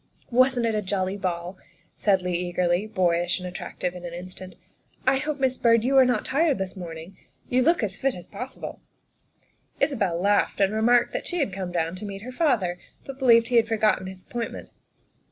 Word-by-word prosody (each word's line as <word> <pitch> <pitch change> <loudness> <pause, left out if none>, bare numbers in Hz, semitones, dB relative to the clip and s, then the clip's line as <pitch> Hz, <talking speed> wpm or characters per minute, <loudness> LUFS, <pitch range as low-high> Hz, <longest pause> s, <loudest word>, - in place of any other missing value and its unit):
" - - -33
Wasn't 255 -2 +2
it 225 - +1
a 210 - 0
jolly 190 -1 -1
ball?" 180 -1 -4 0.4
said 195 -3 +2
Leigh 180 0 -1
eagerly, 175 +3 0
boyish 175 -3 +1
and 180 - -6
attractive 180 0 -4
in 180 -1 -9
an 170 -1 -6
instant. 185 +1 -9 0.3
" - - -35
I 265 +1 +4
hope, 295 +1 -3
Miss 260 -1 +1
Byrd, 230 -1 +4
you 265 +3 +1
are 260 - +7
not 245 -4 0
tired 310 +2 +2
out - - -5
this 190 0 -4
morning. 170 0 -8 0.3
You 255 +1 +3
look 330 -1 +3
as 195 -2 -2
fit 270 -1 0
as 175 - -10
possible. 250 +6 -8 0.4
' - - -42
' - - -39
Isabel 195 - +1
laughed 205 +3 +2
and 195 +1 +3
remarked 240 +3 +3
that - - -3
she 355 - -3
had 275 - 0
come 185 -2 -4
down 165 0 -1
to 210 - -7
meet 200 0 -7
her 255 - -7
father, 235 - +1 0.3
but 275 0 -8
believed 230 -3 +5
he 245 - +3
had 225 -1 +4
forgotten 215 -4 +1
his 190 -1 -9
appointment. 235 -1 -6
205 Hz, 215 wpm, -25 LUFS, 180-250 Hz, 0.4 s, are